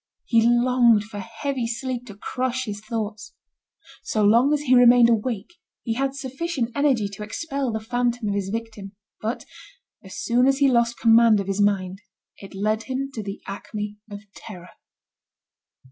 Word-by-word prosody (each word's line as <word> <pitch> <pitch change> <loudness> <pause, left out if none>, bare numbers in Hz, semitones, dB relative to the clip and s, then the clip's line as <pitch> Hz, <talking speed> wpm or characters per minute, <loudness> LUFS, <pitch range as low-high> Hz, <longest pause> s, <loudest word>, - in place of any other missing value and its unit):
He 230 -1 +3
longed 240 -2 +4
for 210 -1 -9
heavy 230 +4 -4
sleep 245 +1 -4
to 205 - -10
crush 255 +4 -3
his 205 -2 -5
thoughts. 215 -1 -5 0.7
So 215 - -1
long 235 +7 +4
as 300 -1 +1
he 260 -3 +2
remained 245 -1 +7
awake, 225 - -2 0.3
he 230 - -1
had 270 +3 -2
sufficient 270 -1 -3
energy 265 -6 +1
to 200 +1 -10
expel 275 +4 -3
the 220 - -2
phantom 240 0 -1
of - - -1
his 200 -1 -2
victim; 220 -2 -6 0.3
but 225 +3 -3 0.6
as - - -10
soon 245 +2 +2
as 270 0 +3
he 280 0 +4
lost 235 -1 +2
command 225 -2 +5
of 200 - -3
his 195 +1 -1
mind 195 -1 0 0.4
it 195 -1 -12
led 215 +3 -1
him 270 +1 -3
to 225 - -4
the 200 -1 -7
acme 210 +1 -6
of 205 0 -8
terror. 180 -5 -11
230 Hz, 165 wpm, -23 LUFS, 210-255 Hz, 0.7 s, remained